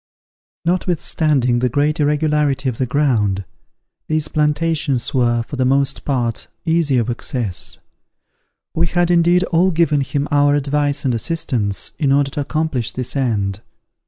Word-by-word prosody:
Notwithstanding 155 -7 +1
the 125 +1 +1
great 145 +5 0
irregularity 150 -2 +1
of 125 -3 -2
the 130 - 0
ground, 115 -9 +1 0.6
these 155 -1 -1
plantations 150 -3 0
were, 120 -3 +2
for 140 - -8
the 130 - +1
most 135 +1 +1
part, 120 -5 -1 0.2
easy 160 -5 +2
of 120 -2 +1
access. 120 -4 -2 1.0
We 170 +1 +1
had, 175 +1 +1
indeed, 175 +1 +4
all 175 +2 +4
given 160 -4 +2
him 140 +1 -2
our 145 0 +4
advice 145 0 0
and 130 - +2
assistance, 120 - -2
in 140 -4 +2
order 140 0 +2
to 145 - -3
accomplish 145 -4 -2
this 125 +1 -4
end. 105 -7 -1
145 Hz, 140 wpm, -19 LUFS, 125-155 Hz, 1.0 s, indeed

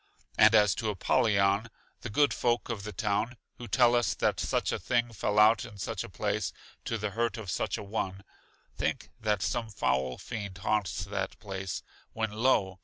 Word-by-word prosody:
And 110 +1 +7
as 105 -4 +6
to 110 - -1
Apollyon, 100 +1 +2 0.3
the 125 - -6
good 145 +6 +3
folk 120 0 0
of 115 -4 -3
the 105 +1 -6
town, 105 +4 -1 0.2
who 120 - -7
tell 120 -1 +4
us 120 -1 +2
that - - +1
such - - 0
a - - -2
thing 120 -1 0
fell 105 0 -1
out 110 0 +6
in 105 - -10
such 95 - -3
a - - -9
place, - - -1 0.3
to 115 - -1
the 105 -1 -3
hurt 115 +1 -1
of 105 -5 -5
such - - -1
a - - -6
one, 100 -2 -3 0.5
think - - -2
that 105 -3 0
some 115 +5 -1
foul 65 -8 0
fiend 100 -4 -6
haunts 105 -1 -1
that - - -3
place, 95 -2 -5 0.3
when 110 -1 -1
lo! 105 -5 +2
105 Hz, 185 wpm, -30 LUFS, 100-115 Hz, 0.5 s, And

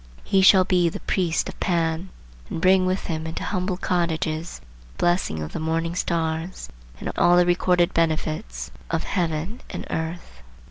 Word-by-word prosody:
He 195 - +3
shall 190 0 +7
be 180 -2 +3
the - - -6
priest 175 -4 0
of - - -8
Pan, 170 0 0 0.4
and - - -3
bring 185 +1 +4
with 185 +1 -1
him 160 -1 -3
into 160 - -5
humble 185 -1 -1
cottages 170 -2 -1
the - - -23 0.3
blessing 175 - +1
of 75 - -6
the - - -3
morning 165 +1 -1
stars, 165 0 -2 0.3
and - - -3
all 175 0 +5
the 180 - +5
recorded 175 0 +2
benefits 155 - -1 0.2
of 165 0 -1
heaven 175 +5 -2
and - - -6
earth. 160 - -5
170 Hz, 160 wpm, -24 LUFS, 160-180 Hz, 0.4 s, shall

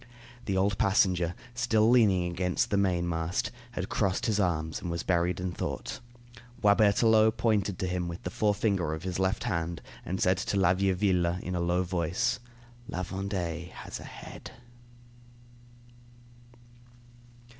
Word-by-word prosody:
The 95 -2 0
old 95 +1 +1
passenger, 90 -3 +2 0.2
still 120 -3 +2
leaning 105 -7 +4
against 90 +1 0
the - - +2
mainmast, 85 -2 0 0.2
had 90 -3 -3
crossed 95 -3 0
his 105 -2 +1
arms, 80 -4 0
and 90 - -4
was 85 0 -3
buried 90 0 +1
in 90 0 -2
thought. - - -4 0.6
Boisberthelot 110 +2 +4
pointed 105 -4 +1
to - - -2
him 90 -1 -2
with 85 0 -7
the 90 - -4
forefinger 100 -6 +1
of 80 - -9
his 90 -1 -3
left 95 0 0
hand, 85 0 -2 0.2
and 95 +2 -3
said 90 +1 +3
to 100 - -1
La 95 -2 +4
Vieuville 95 -2 +1
in 90 - -4
a 90 - -1
low 90 +1 +1
voice: 90 +8 0 0.5
"La 90 - -3
Vendée 90 -3 -3
has - - -8
a - - -9
head." - - -10
95 Hz, 145 wpm, -29 LUFS, 85-100 Hz, 0.6 s, leaning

